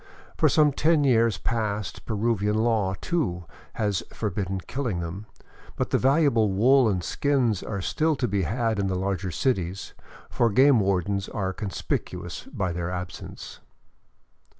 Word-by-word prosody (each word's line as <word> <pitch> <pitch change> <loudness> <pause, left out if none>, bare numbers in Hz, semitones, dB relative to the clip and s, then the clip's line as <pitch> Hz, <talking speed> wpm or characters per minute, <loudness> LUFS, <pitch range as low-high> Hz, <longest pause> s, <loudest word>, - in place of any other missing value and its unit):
For - - +3
some 150 -1 +4
ten 155 +1 +3
years 115 -5 +3
past 105 -3 -3
Peruvian 105 -1 0
law, 110 -4 +1
too, 120 - -1 0.3
has 105 -4 0
forbidden 95 -2 -3
killing 120 -8 -3
them, 90 +5 -6 0.5
but - - -2
the - - +3
valuable 135 -6 +3
wool 125 +5 +4
and 90 -3 -1
skins 125 - +1
are 100 -3 -4
still 160 - +1
to 130 -3 -1
be 100 -2 0
had 110 +4 -1
in 100 - 0
the 95 - -1
larger 95 0 -2
cities, 95 -1 -2 0.3
for 120 - +1
game 130 +3 +5
wardens 100 0 0
are 95 -2 -2
conspicuous 100 -1 -4
by 95 -2 -3
their 85 0 -3
absence. 90 0 -7
105 Hz, 145 wpm, -25 LUFS, 95-120 Hz, 0.5 s, game